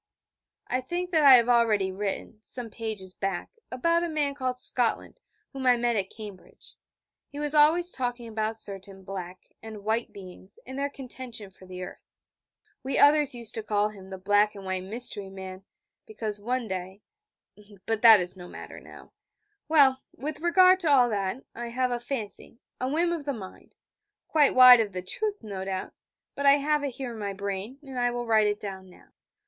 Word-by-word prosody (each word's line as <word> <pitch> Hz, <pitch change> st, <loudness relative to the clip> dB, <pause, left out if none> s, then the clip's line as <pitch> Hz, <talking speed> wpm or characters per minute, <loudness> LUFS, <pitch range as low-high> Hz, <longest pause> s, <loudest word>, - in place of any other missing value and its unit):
I 255 Hz, -, -1 dB
think 350 Hz, +7 st, -4 dB
that 320 Hz, -3 st, +3 dB
I 275 Hz, -2 st, +10 dB
have 235 Hz, -1 st, +4 dB
already 225 Hz, -5 st, +3 dB
written, 205 Hz, +2 st, -5 dB
some 235 Hz, 0 st, -7 dB
pages 210 Hz, -5 st, -5 dB
back, 195 Hz, -3 st, -3 dB, 0.2 s
about 335 Hz, +7 st, +1 dB
a 345 Hz, -, -2 dB
man 295 Hz, -3 st, -1 dB
called 255 Hz, -2 st, -3 dB
Scotland, 245 Hz, -, +1 dB, 0.3 s
whom 265 Hz, -1 st, -3 dB
I 245 Hz, -1 st, +5 dB
met 240 Hz, 0 st, 0 dB
at 195 Hz, -2 st, -1 dB
Cambridge. 210 Hz, -4 st, -12 dB, 0.6 s
He 285 Hz, -, -11 dB
was 295 Hz, 0 st, 0 dB
always 320 Hz, +4 st, +4 dB
talking 245 Hz, -2 st, -4 dB
about 220 Hz, 0 st, -2 dB
certain 195 Hz, -2 st, -7 dB
'Black' 185 Hz, -1 st, -8 dB
and 220 Hz, -2 st, -9 dB
'White' 220 Hz, +2 st, -1 dB
beings, 190 Hz, 0 st, -11 dB
and 260 Hz, +2 st, -7 dB
their 280 Hz, 0 st, -1 dB
contention 250 Hz, -6 st, -7 dB
for 185 Hz, 0 st, -17 dB
the 185 Hz, 0 st, -7 dB
earth. -, -, -9 dB, 0.8 s
We 265 Hz, +1 st, -2 dB
others 290 Hz, -2 st, +5 dB
used 235 Hz, -2 st, -3 dB
to 225 Hz, -, -3 dB
call 210 Hz, -1 st, 0 dB
him 195 Hz, -3 st, -13 dB
the 190 Hz, -, -7 dB
black 205 Hz, +2 st, +2 dB
and 195 Hz, -1 st, -10 dB
white 190 Hz, -1 st, -2 dB
mystery 205 Hz, -2 st, -1 dB
man, 190 Hz, 0 st, -9 dB, 0.4 s
because, 215 Hz, -, -4 dB
one 245 Hz, +2 st, -2 dB
day 190 Hz, +1 st, -6 dB, 0.8 s
but 225 Hz, -1 st, -1 dB
that 225 Hz, -3 st, +9 dB
is 180 Hz, +1 st, -1 dB
no 180 Hz, -1 st, -10 dB
matter -, -, -10 dB
now. -, -, -15 dB, 0.5 s
Well, 275 Hz, -4 st, +4 dB, 0.2 s
with 295 Hz, +4 st, -5 dB
regard 365 Hz, +2 st, +5 dB
to 335 Hz, -4 st, 0 dB
all 255 Hz, -4 st, +5 dB
that, 205 Hz, +4 st, -2 dB
I 240 Hz, +1 st, -6 dB
have 250 Hz, +1 st, -1 dB
a 240 Hz, -, -1 dB
fancy, 230 Hz, -3 st, -6 dB, 0.2 s
a 255 Hz, -, -1 dB
whim 335 Hz, +4 st, +1 dB
of 315 Hz, -4 st, -5 dB
the 285 Hz, -, -1 dB
mind 195 Hz, -6 st, -11 dB, 0.5 s
quite 295 Hz, -3 st, +3 dB
wide 255 Hz, -1 st, +10 dB
of 210 Hz, -3 st, -1 dB
the 180 Hz, 0 st, -5 dB
truth, 415 Hz, -, -3 dB
no 195 Hz, -3 st, -6 dB
doubt 190 Hz, -1 st, -4 dB, 0.4 s
but 280 Hz, 0 st, -1 dB
I 280 Hz, -, +9 dB
have 290 Hz, +1 st, +1 dB
it 275 Hz, -4 st, -3 dB
here 260 Hz, -3 st, -5 dB
in 225 Hz, -, -9 dB
my 200 Hz, -1 st, -3 dB
brain, 200 Hz, +5 st, -5 dB
and 265 Hz, -3 st, -6 dB
I 245 Hz, 0 st, +2 dB
will 240 Hz, 0 st, -4 dB
write 220 Hz, -2 st, +3 dB
it 205 Hz, 0 st, -1 dB
down 190 Hz, -2 st, -7 dB
now. 180 Hz, -, -19 dB
230 Hz, 190 wpm, -27 LUFS, 200-270 Hz, 0.8 s, I